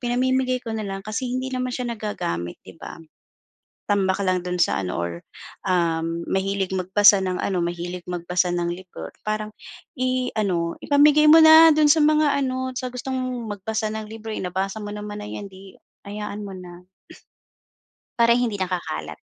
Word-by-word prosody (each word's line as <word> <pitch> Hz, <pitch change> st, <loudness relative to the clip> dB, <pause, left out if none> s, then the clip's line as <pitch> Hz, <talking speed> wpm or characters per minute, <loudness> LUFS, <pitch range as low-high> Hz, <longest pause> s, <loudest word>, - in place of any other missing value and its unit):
pinamimigay 255 Hz, +1 st, +1 dB
ko 225 Hz, -, -4 dB
na 220 Hz, -, -3 dB
lang 195 Hz, -1 st, -5 dB
kasi 225 Hz, +4 st, -3 dB
hindi 260 Hz, +1 st, -3 dB
naman 255 Hz, 0 st, -2 dB
siya 245 Hz, -2 st, -3 dB
nagagamit 85 Hz, -, -4 dB
di -, -, -12 dB
ba? 165 Hz, -, -9 dB, 0.9 s
Tambak 195 Hz, -1 st, +1 dB
lang 185 Hz, -1 st, +1 dB
do'n 180 Hz, 0 st, -3 dB
sa 100 Hz, -, +1 dB
ano 90 Hz, -, -3 dB
or 85 Hz, 0 st, -2 dB, 0.5 s
um, 170 Hz, -2 st, 0 dB
mahilig 190 Hz, 0 st, -1 dB
magbasa 195 Hz, +2 st, +5 dB
ng 185 Hz, -1 st, -2 dB
ano, 185 Hz, -3 st, -1 dB
mahilig 175 Hz, +1 st, -5 dB
magbasa 180 Hz, +1 st, 0 dB
ng 175 Hz, -1 st, -1 dB
libro 175 Hz, -, -9 dB, 0.2 s
parang 215 Hz, 0 st, -2 dB, 0.5 s
i 255 Hz, 0 st, 0 dB
ano 175 Hz, -6 st, 0 dB
ipamigay 295 Hz, +1 st, +5 dB
mo 325 Hz, -, +9 dB
na 320 Hz, +1 st, +9 dB
do'n 300 Hz, 0 st, +4 dB
sa 310 Hz, +1 st, +5 dB
mga 300 Hz, -1 st, +3 dB
ano, 260 Hz, 0 st, -3 dB
sa 255 Hz, -1 st, -3 dB
gustong 260 Hz, +1 st, -4 dB, 0.3 s
magbasa 215 Hz, +2 st, -3 dB
ng 220 Hz, 0 st, -5 dB
libro, 225 Hz, 0 st, -8 dB
eh, -, -, -4 dB
nabasa 190 Hz, +3 st, -3 dB
mo 205 Hz, -, -6 dB
naman 210 Hz, 0 st, -6 dB
na 210 Hz, -, -8 dB
'yan, 205 Hz, -, -6 dB
'di 190 Hz, 0 st, -15 dB, 0.3 s
hayaan 210 Hz, 0 st, -6 dB
mo 195 Hz, -, -7 dB
na. 180 Hz, -1 st, -11 dB, 1.3 s
Para 235 Hz, 0 st, +5 dB
hindi 235 Hz, -4 st, 0 dB
nakakalat. 175 Hz, -, -4 dB
205 Hz, 170 wpm, -23 LUFS, 180-250 Hz, 1.3 s, mo